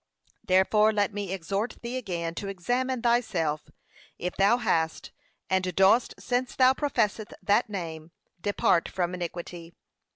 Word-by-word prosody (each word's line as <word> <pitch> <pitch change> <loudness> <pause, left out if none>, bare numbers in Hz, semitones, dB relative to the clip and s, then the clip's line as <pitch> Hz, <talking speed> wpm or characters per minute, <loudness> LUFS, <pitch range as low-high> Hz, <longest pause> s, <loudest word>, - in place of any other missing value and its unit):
Therefore 210 +4 +4
let 205 -1 0
me 200 -2 -4
exhort 195 +5 -3
thee 235 +2 -4
again 175 -9 -3
to 200 - -5
examine 245 +7 -1
thyself, 180 -11 0 0.5
if 180 - -4
thou 200 +5 +4
hast, 165 -9 -1 0.4
and 185 -2 0
dost 195 +6 +4
since 250 0 -2
thou 255 0 +5
professest 225 -7 -1
that 210 +3 +2
name 165 -5 -6 0.3
depart 190 -3 +2
from 180 -1 -2
iniquity. 175 -1 -6
195 Hz, 130 wpm, -27 LUFS, 175-235 Hz, 0.5 s, thou